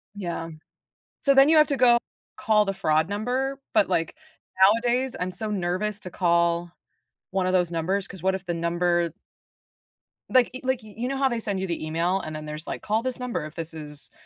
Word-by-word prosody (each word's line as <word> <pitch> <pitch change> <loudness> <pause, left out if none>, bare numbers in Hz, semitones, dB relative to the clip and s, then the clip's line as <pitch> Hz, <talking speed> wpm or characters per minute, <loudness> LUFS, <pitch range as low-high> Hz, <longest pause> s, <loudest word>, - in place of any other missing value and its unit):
Yeah. 170 -4 -4 0.7
So 280 - +4
then 270 +2 +7
you 320 - +6
have 305 - +6
to 280 - -1
go 240 -1 +6 0.4
call 210 -1 +3
the 195 - -1
fraud 155 -1 +1
number, 255 +6 -2
but 210 -2 +3
like, 165 - 0 0.7
nowadays, 250 +2 0
I'm 180 +1 -2
so 215 +3 -5
nervous 195 +2 -1
to 180 - -7
call 170 -1 +1 0.6
one 190 -1 0
of 185 - +1
those 180 -2 +2
numbers, 185 +4 -1
'cause 190 -4 -11
what 190 +1 +2
if 190 0 -5
the 175 - -1
number 170 0 +1 1.2
like, 255 -2 +4
y 260 - -6
like, 260 -2 -1
you 215 -1 -13
you 240 +2 -2
know 270 +1 -2
how 270 0 +2
they 235 -2 -2
send 205 -3 -2
you 190 - -2
the 170 -2 -3
email 170 +4 0
and 155 -4 -6
then 155 0 -6
there's 150 +1 -7
like, - - -4
"Call 215 +1 0
this 255 0 -3
number 250 -10 -3
if 155 - -10
this 165 -1 -6
is" 150 -2 -8
190 Hz, 210 wpm, -25 LUFS, 170-240 Hz, 1.2 s, then